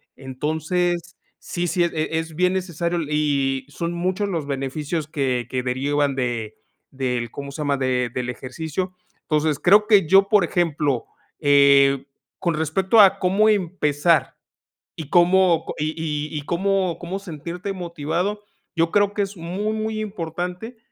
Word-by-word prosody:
Entonces, 160 Hz, +6 st, -2 dB, 0.2 s
sí, 175 Hz, 0 st, -3 dB
sí, 175 Hz, +1 st, +1 dB
e 160 Hz, -1 st, -1 dB
es 160 Hz, -1 st, -6 dB
bien 180 Hz, +2 st, +2 dB
necesario 175 Hz, -2 st, -2 dB
y 140 Hz, -3 st, 0 dB
son 170 Hz, +4 st, -4 dB
muchos 185 Hz, +4 st, -1 dB
los 165 Hz, -6 st, -2 dB
beneficios 145 Hz, +3 st, -3 dB
que 130 Hz, -5 st, -1 dB
que 130 Hz, -1 st, -2 dB
derivan 140 Hz, +3 st, 0 dB
de 120 Hz, -4 st, -3 dB, 0.4 s
del, 125 Hz, -3 st, -2 dB
¿cómo 140 Hz, 0 st, -7 dB
se 150 Hz, -, -6 dB
llama?, 145 Hz, -1 st, 0 dB
de 125 Hz, -2 st, 0 dB
del 125 Hz, -1 st, -3 dB
ejercicio. 160 Hz, +9 st, -4 dB, 0.3 s
Entonces, 150 Hz, -2 st, 0 dB
creo 210 Hz, +3 st, +5 dB
que 205 Hz, -5 st, +5 dB
yo, 195 Hz, +3 st, +6 dB
por 210 Hz, -3 st, +5 dB
ejemplo, 150 Hz, -7 st, 0 dB, 0.3 s
eh, 140 Hz, -2 st, +5 dB, 0.3 s
con 170 Hz, -3 st, -1 dB
respecto 165 Hz, +7 st, +2 dB
a 195 Hz, -2 st, +7 dB
cómo 195 Hz, +3 st, +2 dB
empezar 170 Hz, -5 st, +1 dB, 0.6 s
y 155 Hz, -3 st, -7 dB
cómo, 175 Hz, 0 st, +4 dB
co -, -, -6 dB
y 155 Hz, -1 st, -2 dB
y -, -, -3 dB
cómo 190 Hz, 0 st, 0 dB
cómo 180 Hz, +3 st, -5 dB
sentirte 175 Hz, +1 st, -6 dB
motivado, 175 Hz, +3 st, -3 dB, 0.3 s
yo 165 Hz, 0 st, +1 dB
creo 205 Hz, -1 st, +2 dB
que 205 Hz, -, -1 dB
es 200 Hz, +1 st, -6 dB
muy, 185 Hz, +6 st, -3 dB
muy 220 Hz, 0 st, -3 dB
importante 180 Hz, +3 st, -5 dB
165 Hz, 145 wpm, -22 LUFS, 145-185 Hz, 0.6 s, a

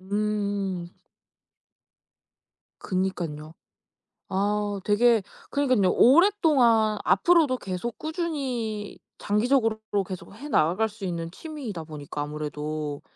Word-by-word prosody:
음. 200 Hz, -3 st, -2 dB, 1.9 s
그러니깐요. 170 Hz, -5 st, -3 dB, 0.7 s
아 205 Hz, +1 st, -1 dB
되게 225 Hz, +1 st, +4 dB, 0.3 s
그러니깐요. 255 Hz, -9 st, +2 dB
오랫동안 260 Hz, -, +5 dB
앞으로도 325 Hz, -7 st, +4 dB
계속 195 Hz, +4 st, -5 dB
꾸준히 265 Hz, -, -3 dB, 0.2 s
장기적으로 225 Hz, +1 st, +1 dB
그리고 200 Hz, -1 st, +1 dB
계속 185 Hz, +2 st, -8 dB
해 285 Hz, +7 st, -9 dB
나갈 185 Hz, -, +2 dB
수 210 Hz, -1 st, -10 dB
있는 170 Hz, -2 st, -3 dB
취미이다 235 Hz, -, -7 dB
보니까 150 Hz, -1 st, -6 dB
아무래도, 150 Hz, 0 st, -4 dB
205 Hz, 245 characters per minute, -26 LUFS, 180-245 Hz, 1.9 s, 오랫동안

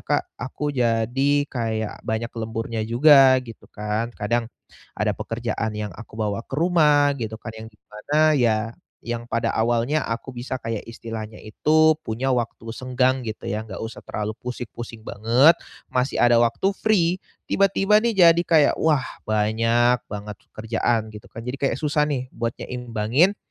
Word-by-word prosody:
Kak, -, -, 0 dB, 0.2 s
aku 145 Hz, +4 st, -3 dB
jadi 120 Hz, +3 st, +1 dB, 0.2 s
kayak 110 Hz, -3 st, -3 dB
banyak 110 Hz, +1 st, -3 dB
lemburnya 115 Hz, 0 st, -4 dB
juga, 135 Hz, +1 st, +7 dB
gitu 115 Hz, -2 st, -12 dB
kan, 105 Hz, +2 st, -3 dB
kadang 115 Hz, +2 st, -1 dB, 0.5 s
ada -, -, +1 dB
pekerjaan 115 Hz, -1 st, -3 dB
yang 105 Hz, -4 st, -4 dB
aku 115 Hz, +1 st, -12 dB
bawa 105 Hz, 0 st, -2 dB
ke -, -, -7 dB
rumah, 150 Hz, -4 st, +4 dB
gitu 110 Hz, -2 st, -4 dB
kan, 115 Hz, -, -8 dB
yang 110 Hz, 0 st, -9 dB
di 105 Hz, -, -28 dB
mana, 150 Hz, +9 st, +2 dB
ya, 120 Hz, -6 st, +3 dB, 0.5 s
yang 120 Hz, 0 st, -3 dB
pada 115 Hz, -, 0 dB
awalnya 120 Hz, +6 st, +1 dB
aku 115 Hz, +3 st, -4 dB
bisa 125 Hz, +2 st, -4 dB
kayak 115 Hz, -3 st, -4 dB
istilahnya 115 Hz, -2 st, -7 dB
itu, 155 Hz, +8 st, +3 dB
punya 125 Hz, +1 st, -2 dB
waktu 120 Hz, -1 st, -3 dB
senggang, 130 Hz, +1 st, 0 dB
gitu 110 Hz, -, -6 dB
ya, 110 Hz, +1 st, -2 dB
nggak 95 Hz, -, -7 dB
usah 110 Hz, +1 st, -7 dB
terlalu 105 Hz, 0 st, -4 dB
pusing-pusing 120 Hz, -2 st, -7 dB
banget 120 Hz, +10 st, +4 dB, 0.4 s
masih 125 Hz, +2 st, 0 dB
ada 120 Hz, -1 st, +5 dB
waktu 120 Hz, +12 st, +1 dB
free, 185 Hz, -5 st, +2 dB, 0.3 s
tiba-tiba 195 Hz, +1 st, +3 dB
nih, 235 Hz, -1 st, +1 dB
jadi 170 Hz, +1 st, +5 dB
kayak 155 Hz, -3 st, +4 dB
"Wah, 150 Hz, -5 st, +2 dB, 0.2 s
banyak 115 Hz, +3 st, +2 dB
banget 105 Hz, 0 st, -6 dB
pekerjaan," 110 Hz, 0 st, -1 dB
gitu 105 Hz, -, -11 dB
kan, 115 Hz, -, -8 dB
jadi 125 Hz, +2 st, -3 dB
kayak 135 Hz, -3 st, +1 dB
susah 150 Hz, -1 st, +1 dB
nih, 130 Hz, -3 st, -2 dB
buat 115 Hz, 0 st, -1 dB
nyeimbangin 125 Hz, -, 0 dB
120 Hz, 155 wpm, -23 LUFS, 110-140 Hz, 0.5 s, juga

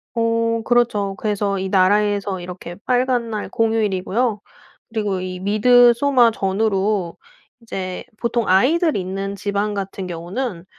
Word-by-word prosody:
어 230 Hz, 0 st, +1 dB
그렇죠. 215 Hz, -5 st, +1 dB
그래서 205 Hz, -2 st, -1 dB
이 190 Hz, -, -3 dB
나라에서 200 Hz, 0 st, +2 dB
이렇게 175 Hz, -1 st, -8 dB
빨간날 245 Hz, -4 st, 0 dB
공휴일이고요. 220 Hz, 0 st, 0 dB, 0.5 s
그리고 210 Hz, -4 st, -2 dB
이 185 Hz, 0 st, -5 dB
미드소마 240 Hz, +4 st, +4 dB
전후로 195 Hz, -2 st, -1 dB, 0.4 s
이제 185 Hz, -5 st, -5 dB, 0.2 s
보통 235 Hz, -1 st, -1 dB
아이들이 295 Hz, -, +3 dB
있는 195 Hz, +2 st, -4 dB
집안 205 Hz, +1 st, -2 dB
같은 195 Hz, -1 st, -5 dB
경우는 180 Hz, +3 st, -5 dB
205 Hz, 290 characters per minute, -20 LUFS, 190-230 Hz, 0.5 s, 미드소마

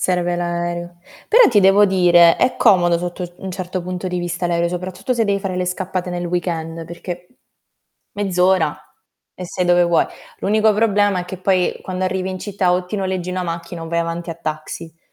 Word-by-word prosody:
Serve 175 Hz, -1 st, 0 dB
l'aereo. 175 Hz, 0 st, -3 dB, 0.3 s
Però 470 Hz, +3 st, +7 dB
ti 225 Hz, -, +3 dB
devo 195 Hz, +2 st, +6 dB
dire, 175 Hz, -3 st, +5 dB
è 255 Hz, -, +1 dB
comodo 175 Hz, -3 st, +4 dB
sotto 175 Hz, +1 st, -5 dB
u 175 Hz, -, -10 dB
un 190 Hz, -, -4 dB
certo 185 Hz, 0 st, -4 dB
punto 180 Hz, +1 st, -5 dB
di 180 Hz, 0 st, -2 dB
vista 175 Hz, 0 st, -2 dB
l'aereo, 170 Hz, 0 st, +1 dB
soprattutto 185 Hz, +6 st, -3 dB
se 230 Hz, -2 st, +1 dB
devi 200 Hz, -1 st, 0 dB
fare 190 Hz, -2 st, -3 dB
le 180 Hz, -, 0 dB
scappate 185 Hz, 0 st, -3 dB
nel 175 Hz, 0 st, -3 dB
weekend, 165 Hz, -2 st, -3 dB
perché 175 Hz, +1 st, -7 dB, 0.9 s
mezz'ora 185 Hz, -5 st, +1 dB, 0.6 s
e 185 Hz, -, -7 dB
sei 180 Hz, -, -2 dB
dove 175 Hz, 0 st, +4 dB
vuoi. 170 Hz, -1 st, +2 dB, 0.3 s
L'unico 215 Hz, +2 st, +3 dB
problema 205 Hz, -3 st, +2 dB
è -, -, -5 dB
che 185 Hz, 0 st, -7 dB
poi 185 Hz, -1 st, +1 dB
quando 185 Hz, 0 st, -3 dB
arrivi 185 Hz, 0 st, -1 dB
in 185 Hz, -, -5 dB
città, 195 Hz, -3 st, 0 dB
o 180 Hz, 0 st, 0 dB
ti 180 Hz, -, -7 dB
noleggi 185 Hz, -2 st, -2 dB
una 185 Hz, 0 st, -2 dB
macchina 170 Hz, 0 st, -5 dB
o 165 Hz, -, -7 dB
vai 170 Hz, 0 st, 0 dB
avanti 170 Hz, +1 st, -4 dB
a -, -, -4 dB
taxi. 155 Hz, 0 st, -6 dB
180 Hz, 195 wpm, -19 LUFS, 175-190 Hz, 0.9 s, Però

